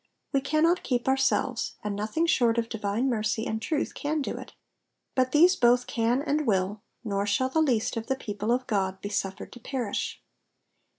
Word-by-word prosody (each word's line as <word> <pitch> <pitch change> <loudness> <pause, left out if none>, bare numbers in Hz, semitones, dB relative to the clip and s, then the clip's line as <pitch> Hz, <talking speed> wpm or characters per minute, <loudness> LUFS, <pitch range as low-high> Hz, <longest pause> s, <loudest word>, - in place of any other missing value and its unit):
We 275 - +3
cannot 315 +5 +2
keep 245 -1 -1
ourselves, 265 -2 +1
and 210 -1 -2
nothing 215 +11 0
short 240 -8 +3
of 230 -1 0
divine 220 +3 -1
mercy 220 -2 0
and 220 -2 -2
truth 300 +5 -1
can 305 +2 -2
do - - -3
it; - - -9 0.6
but 255 -1 +1
these 345 +6 +6
both 245 -2 +4
can 240 +4 0
and 300 -1 0
will, 200 0 +1 0.2
nor 200 -2 -1
shall 260 +6 +1
the 320 +4 +2
least 245 -8 +1
of 225 - -4
the 265 - +1
people 210 -3 -3
of 255 +1 +1
God 190 -4 -1
be 205 - -4
suffered 195 -2 -3
to 245 - -11
perish. 245 -3 -3
240 Hz, 185 wpm, -27 LUFS, 210-270 Hz, 0.6 s, these